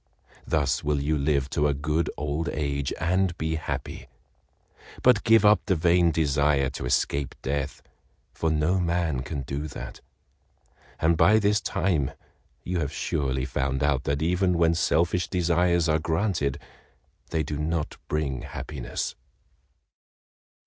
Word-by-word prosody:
Thus 75 -4 +1
will 75 -1 +1
you 75 +3 0
live 70 -2 +1
to 75 -1 +2
a 70 - +1
good 75 +3 -1
old 75 +3 -2
age 70 -2 -2
and 90 +2 +1
be 80 0 -1
happy, 80 - -5 1.0
but 125 -4 +5
give 115 -2 +5
up 105 0 +5
the 95 - +3
vain 85 +1 +3
desire 70 -3 +2
to 60 - -5
escape 70 +2 0
death, 70 +1 -3 0.5
for 80 - -1
no 80 +4 +1
man 85 -6 0
can 70 +1 -4
do 70 +4 -4
that, - - -8 1.0
and 80 +1 +3
by 105 +6 +5
this 105 0 +2
time 80 -9 0 0.5
you 90 0 -2
have 75 -4 -2
surely 65 -2 -1
found 65 +1 -1
out 70 -2 +1
that 70 +1 0
even 90 +1 +2
when 85 0 +4
selfish 85 +2 +1
desires 85 -1 +2
are 80 0 +2
granted 80 -3 0 0.7
they 80 -1 0
do 75 -1 -4
not 80 0 -2
bring 70 -4 -2
happiness." 70 -5 -5
80 Hz, 140 wpm, -26 LUFS, 70-85 Hz, 1.0 s, but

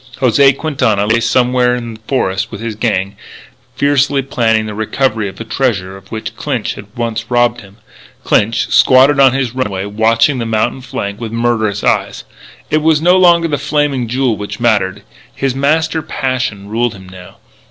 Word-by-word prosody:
José 135 +2 +4
Quintana 125 -10 0
lay 115 +2 +2
somewhere 125 +1 +2
in 120 -2 -6
the 110 - -13
forests 100 -5 -1
with 105 - -8
his 115 0 -4
gang, 100 -3 -1 0.6
fiercely 140 -1 +1
planning 115 -4 0
the 105 - -6
recovery 110 0 -1
of - - -12
the - - -7
treasure 110 -6 -2
of 95 0 -16
which 110 -1 -6
Clinch - - -3
had 100 - -11
once 115 -1 -3
robbed 120 -1 +1
him. 100 +1 -17 0.5
Clinch 110 +2 +1
squatted 135 +2 +5
on 135 -2 +6
his 130 -3 -1
runway, 100 -7 -3
watching 115 +6 +1
the 115 - -2
mountain 110 +4 -1
flank 100 -4 -5
with 115 -2 -5
murderous 115 -3 -1
eyes. - - 0 0.5
It 155 - +2
was 160 -1 +3
no 175 +3 +4
longer 175 -2 +4
the 145 -3 -2
Flaming 145 -3 -1
Jewel 125 -1 0
which 105 0 -6
mattered. 100 -4 0 0.3
His 135 -2 -1
master 160 +4 0
passion 130 -8 -3
ruled 115 +1 -1
him 95 -1 -13
now. 90 -1 -13
120 Hz, 175 wpm, -14 LUFS, 105-135 Hz, 0.6 s, on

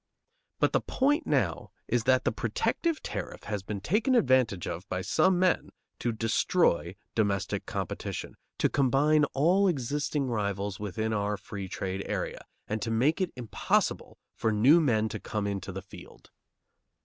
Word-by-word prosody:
But - - +2
the - - +3
point 290 +5 +1
now - - 0 0.2
is 120 -2 0
that 130 0 +4
the - - +1
protective 335 -9 -1
tariff - - -5
has 105 -2 -3
been 100 +1 -5
taken 215 - +2
advantage 130 - +3
of 90 +4 -6
by 90 0 -2
some 185 - +3
men 185 0 +2 0.3
to 120 - 0
destroy 110 - +1 0.2
domestic 100 -3 0
competition, - - -4 0.2
to - - +3
combine 145 +3 +3
all 180 +8 +4
existing 145 -1 -1
rivals 100 -4 -2
within 110 +2 -2
our 105 0 0
free 100 0 -7
trade 95 +1 -3
area, - - -3 0.2
and 110 +1 -2
to 115 - -2
make 130 +10 +2
it 185 - 0
impossible 120 -3 -1 0.2
for 110 - 0
new 130 +11 +6
men 110 -7 +2
to - - -5
come 105 -2 -3
into 100 -1 -3
the 95 0 -6
field. 95 -2 -14
115 Hz, 155 wpm, -29 LUFS, 100-150 Hz, 0.3 s, new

